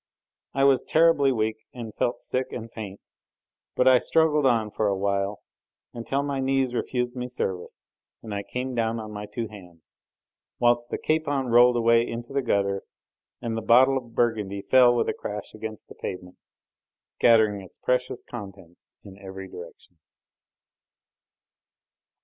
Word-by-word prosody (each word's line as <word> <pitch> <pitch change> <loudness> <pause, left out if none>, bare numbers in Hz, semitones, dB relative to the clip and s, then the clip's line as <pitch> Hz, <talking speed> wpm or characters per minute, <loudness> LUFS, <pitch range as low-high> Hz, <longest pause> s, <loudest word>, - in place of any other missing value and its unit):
I 135 - +2
was 140 -1 +5
terribly 160 -4 +4
weak 110 -2 -1 0.2
and 115 -3 -7
felt 120 0 -2
sick 130 0 -2
and 115 -1 -7
faint, 100 -4 -7 0.8
but 125 - +3
I 130 -1 +7
struggled 150 -2 +3
on 115 -4 +1
for 110 - 0
a 100 -1 0
while, 100 +1 -1 0.5
until 120 +4 -2
my 140 -1 -2
knees 135 -1 +1
refused 125 0 -2
me 125 0 -4
service 95 -7 -5 0.4
and 110 -2 -6
I 100 - -2
came 125 +5 -4
down 115 -1 0
on 110 -1 -7
my 105 0 -6
two 115 +2 -4
hands, 90 -6 -15 0.6
whilst 120 0 +2
the - - -2
capon 145 -5 0
rolled 120 +1 +6
away 115 0 +4
into 120 +3 -6
the 140 - +1
gutter, 100 -5 0 0.6
and 115 -1 -2
the 115 - -2
bottle 130 +5 +5
of 120 -3 -5
Burgundy 105 -4 0
fell 125 +3 +5
with 120 - +1
a - - 0
crash 105 -1 -6
against 110 0 -8
the - - -12
pavement, 90 0 -7 0.7
scattering 110 -3 +3
its 95 - -15
precious 125 -1 -1
contents 95 -6 -11
in 100 -1 -13
every 95 -1 -8
direction. 90 -1 -12
115 Hz, 155 wpm, -25 LUFS, 100-125 Hz, 0.8 s, I